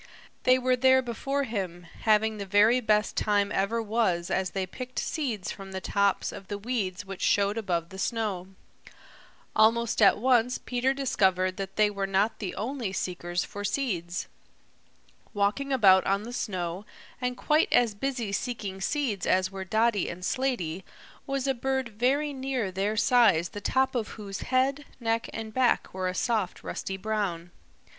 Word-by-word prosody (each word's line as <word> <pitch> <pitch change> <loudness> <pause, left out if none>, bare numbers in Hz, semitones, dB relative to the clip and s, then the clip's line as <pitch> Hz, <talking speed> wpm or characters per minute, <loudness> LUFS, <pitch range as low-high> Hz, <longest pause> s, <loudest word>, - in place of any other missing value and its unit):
They 255 0 +6
were 255 0 +2
there 260 +1 +4
before 270 +4 -2
him, 190 -7 -4
having 215 +4 +1
the 200 - -4
very 210 +5 +5
best 215 -2 +1
time 205 -1 +1
ever 225 +4 0
was 205 -6 0
as 190 0 0
they 195 -1 -2
picked 255 +7 -8
seeds 235 - -2
from 195 -1 -9
the 190 - -3
tops 200 +1 +1
of 195 -1 -10
the 205 - -4
weeds 205 -4 -3
which 195 -1 -8
showed 200 0 +2
above 175 -7 -2
the 190 - -9
snow. 205 -5 -2 1.1
Almost 230 +1 +3
at 200 - +6
once 250 +1 +3
Peter 255 +2 -1
discovered 190 -9 +1
that 195 -1 -5
they 210 -1 +3
were 200 -1 -2
not 195 +3 +1
the 195 -4 -4
only 235 -1 -3
seekers 175 -2 -2
for 205 -1 -7
seeds. 185 -7 -2 1.1
Walking 210 +8 0
about 195 -8 +6
on 200 +1 +1
the 240 +2 -7
snow, 185 -5 -3 0.4
and 250 0 -1
quite 305 +1 +2
as 235 -3 +4
busy 240 -1 -3
seeking 200 -4 -3
seeds 245 -5 -1
as 185 0 +2
were 195 -1 -5
Dotty 220 0 +1
and 180 +1 -7
Slaty, 195 -11 -1 0.4
was 275 -1 -1
a 270 - +2
bird 265 0 -1
very 265 +7 0
near 260 -6 -2
their 200 +3 -1
size 210 -7 +4
the 205 - -8
top 265 +5 +1
of 235 -4 -1
whose 200 -2 -6
head, 265 +3 +1 0.2
neck 230 -1 -1
and 220 -1 -6
back 255 0 +2
were 185 0 -2
a 185 - -2
soft 215 -5 -1
rusty 190 - -4
brown. 190 -5 -2
215 Hz, 165 wpm, -28 LUFS, 190-250 Hz, 1.1 s, They